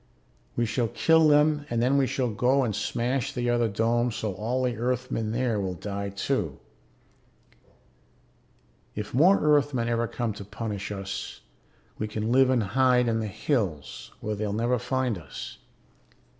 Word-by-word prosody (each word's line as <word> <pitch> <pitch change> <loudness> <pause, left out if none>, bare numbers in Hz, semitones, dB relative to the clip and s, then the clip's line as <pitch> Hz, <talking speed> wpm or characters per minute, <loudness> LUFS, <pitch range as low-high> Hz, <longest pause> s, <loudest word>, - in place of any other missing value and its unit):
We 120 - +1
shall 115 +1 0
kill 160 +7 +4
them 150 0 +3
and 120 - 0
then 125 +4 +2
we 135 -2 +3
shall 125 -3 -1
go 130 +6 +2
and 110 -5 -1
smash 120 +4 -1
the 120 -1 0
other 120 -1 +2
dome 115 +3 +1
so 110 -2 -3
all 120 +6 -2
the 125 -2 0
Earthmen 120 -1 -2
there 120 -2 0
will 95 -2 -2
die 100 +2 -4
too. 100 - -2 2.4
If 105 -1 -5
more 175 +10 +5
Earthmen 145 -5 +2
ever 115 0 0
come 115 -2 -2
to 100 - -8
punish 105 0 -5
us, 100 -1 -5 0.6
we 110 - -1
can 110 +1 -2
live 130 +1 +5
and 125 -4 +2
hide 125 +3 +3
in 115 -1 +1
the 110 - -2
hills 100 - -2
where 110 - -2
they'll 105 -1 -2
never 120 +3 +1
find 125 -4 -1
us. 75 -5 -9
120 Hz, 155 wpm, -27 LUFS, 105-130 Hz, 2.4 s, more